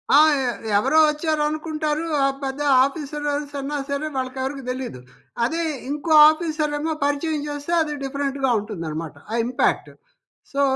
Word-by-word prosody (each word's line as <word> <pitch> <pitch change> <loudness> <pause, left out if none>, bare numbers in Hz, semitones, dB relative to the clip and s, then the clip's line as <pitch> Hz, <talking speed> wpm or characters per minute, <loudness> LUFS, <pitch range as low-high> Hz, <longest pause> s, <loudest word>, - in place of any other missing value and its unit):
ఆ! - - +9 0.2
ఎ 250 - 0 0.3
ఎవరో 270 +8 +2
వచ్చారనుకుంటారు 305 0 -1 0.2
ఆహ్, 275 0 +1
పెద్ద 270 +2 -3 0.2
ఆఫీసర్ 295 +1 -3
అనేసి 290 0 -4
అన్నా 290 +2 -3
సరే 280 +2 -2
వాళ్ళకెవరికీ 265 +1 -3
తెలీదు. 255 - -4 0.5
అదే 330 +6 -1 0.3
ఇంకో 300 +3 -3 0.2
ఆఫీసరేమో 310 -1 -1
పరిచయం 290 +1 -1
చేస్తే 290 +3 -5
అది 300 -1 -1
డిఫరెంట్‌గా 275 -1 -1
ఉంటుందనమాట 165 -7 -5 0.2
ఆ - - -1
ఇంపాక్ట్. 245 0 0 0.6
సో 280 0 0
290 Hz, 130 wpm, -22 LUFS, 265-305 Hz, 0.6 s, ఆ